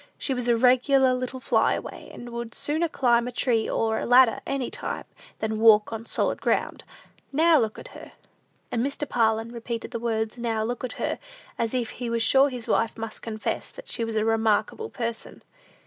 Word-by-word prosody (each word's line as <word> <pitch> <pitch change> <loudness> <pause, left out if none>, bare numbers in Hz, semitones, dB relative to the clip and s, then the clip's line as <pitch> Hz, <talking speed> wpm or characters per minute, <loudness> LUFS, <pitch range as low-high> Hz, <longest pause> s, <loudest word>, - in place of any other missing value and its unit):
She 270 - -2
was 250 -1 -3
a 235 -1 +4
regular 255 +2 +4
little 255 +1 -3
fly - - +2
away, - - -8
and 240 0 -9
would 235 -1 -6
sooner 315 +3 0
climb 240 -5 +2
a - - -4
tree 235 -2 +1
or 220 -1 0
a - - -3
ladder 245 -1 +6
any 275 -2 -2
time, - - -4 0.3
than 220 0 -2
walk 220 -1 +5
on 225 +1 -6
solid - - -1
ground. - - 0 0.5
Now 320 +2 +5
look 220 -3 -1
at - - -10
her!" - - -12 0.6
And 235 - 0
Mr. 280 +2 -3
Parlin 225 -1 +1
repeated 235 -1 -5
the 235 - -3
words, 225 0 -2
"Now 225 -2 -1
look 240 +3 -3
at 255 - -3
her," - - -3 0.4
as 230 +2 -1
if 240 -3 -1
he 245 -2 -5
was 230 0 0
sure 270 +4 +5
his 245 -3 -6
wife 225 0 +1
must 225 -1 -6
confess 215 -1 -3
that - - -12
she 235 - -1
was 225 -1 -3
a 215 0 +1
remarkable 225 - +1
person. 230 - -6
235 Hz, 195 wpm, -25 LUFS, 225-255 Hz, 0.6 s, ladder